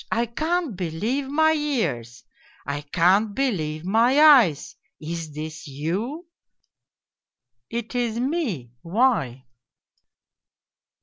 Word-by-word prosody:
I 235 +2 +1
can't 310 - -2
believe 200 - -2
my 315 +3 +3
ears, 170 - -2 0.4
I 140 +1 -3
can't 185 +8 +2
believe 165 - -2
my 230 +8 +3
eyes! 255 - +5 0.2
Is 160 0 -6
this 155 +1 -7
you? 190 - -4 0.4
' - - -65
" - - -69
' 125 -1 -59
It 235 +1 -5
is 235 -2 -1
me, 245 - -2
why 170 - 0
205 Hz, 110 wpm, -23 LUFS, -, 0.4 s, eyes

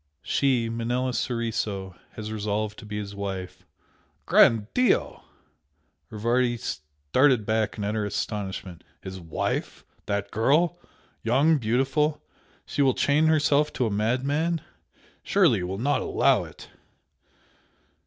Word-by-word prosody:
She 130 -4 +1
Manella 120 +3 -1
Soriso 110 -6 -2 0.2
has 110 -1 -6
resolved 105 0 -2
to 110 - -11
be 105 0 -5
his 100 -1 -5
wife." 95 -2 -6 0.6
"Gran' 110 -3 +5
Dio!" 250 -1 +1 0.9
Rivardi 120 +3 +1
started 75 - 0
back 110 0 0
in 105 - -4
utter 105 +2 -1 0.3
amazement 95 -4 -6 0.2
"His 95 -1 -7
wife? 80 -3 -3 0.2
That 100 0 -2
girl? 160 +10 +2 0.4
Young, 140 +7 +3
beautiful? 135 +6 +1 0.5
She - - -2
will 135 -2 +3
chain 150 +2 +3
herself 150 -1 +3
to 125 - 0
a 110 - -1
madman? 140 +10 0 0.6
Surely - - +3
you 90 - -3
will 95 +1 -4
not 140 +7 +1
allow - - +2
it!" - - -13
115 Hz, 120 wpm, -26 LUFS, 100-135 Hz, 0.9 s, Gran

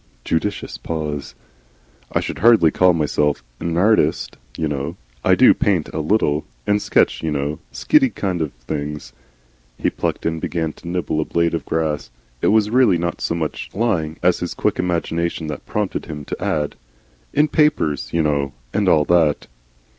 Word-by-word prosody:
Judicious 100 +6 -2
pause. 75 -3 -4 0.8
"I - - +1
should - - -5
hardly 110 -9 +6
call 90 0 +4
myself 75 -4 0 0.2
a - - -6
Nartist, 90 +6 +2 0.2
you 80 - 0
know. 70 -1 -3 0.3
I - - +5
DO - - +7
paint 90 -6 +1
a - - -4
little. 75 -3 +1 0.2
And 105 0 +2
sketch, - - +2
you 80 - -1
know 75 +1 -2
skitty 270 -5 +3
kind 90 -4 -1
of 75 -3 -1
things." 75 +5 -5 0.6
He - - 0
plucked - - -3
and 80 -1 -1
began 80 -3 -2
to - - -13
nibble 85 -3 -1
a - - -2
blade 85 0 +1
of 85 - -2
grass. 80 -2 -1 0.3
It - - +2
was 105 0 +3
really 120 -7 +4
not 85 +1 -3
so 85 - -1
much 80 -2 -3
lying 90 -8 0
as 90 0 +3
his 90 - -4
quick - - 0
imagination 85 -1 -1
that 75 - -7
prompted 105 -2 -2
him 75 -3 -7
to - - -5
add, 75 -1 -1 0.5
"In 150 +2 +3
Papers, 115 - +1
you 85 -1 +1
know, 70 -3 0 0.2
and 100 -2 +2
all 75 -3 +4
that." 80 -4 +3
80 Hz, 170 wpm, -20 LUFS, 75-95 Hz, 0.8 s, DO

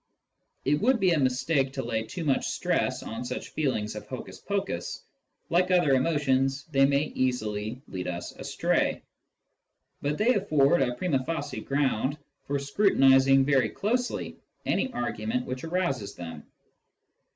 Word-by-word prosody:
It 145 +2 +2
would 245 +2 +3
be 190 -3 +3
a 165 - +3
mistake 135 +1 +1
to 135 -2 -3
lay 110 -1 -1
too 110 +10 -6
much 140 -4 +1
stress - - -1
on 115 +2 -5
such 125 - -5
feelings 130 -9 -1
of - - -8
hocus - - -7
pocus; - - -3 0.5
like 180 +2 +3
other 175 -6 +4
emotions, 135 -1 +1
they 135 -1 +5
may 140 +1 +2
easily 110 -1 -2
lead 90 -1 -5
us 90 -1 -4
astray. - - -1 1.0
But 145 +1 -1
they 235 +4 +4
afford 155 - +3
a 125 -2 +1
prima 135 -3 0
facie 145 -5 -4
ground 140 0 0 0.3
for 140 - 0
scrutinising 135 -4 +4
very 140 -2 +3
closely 245 +4 -2 0.3
any 265 - 0
argument 120 - -2
which 130 0 -5
arouses 160 - -1
them. 80 -3 -8
135 Hz, 140 wpm, -27 LUFS, 125-160 Hz, 1.0 s, they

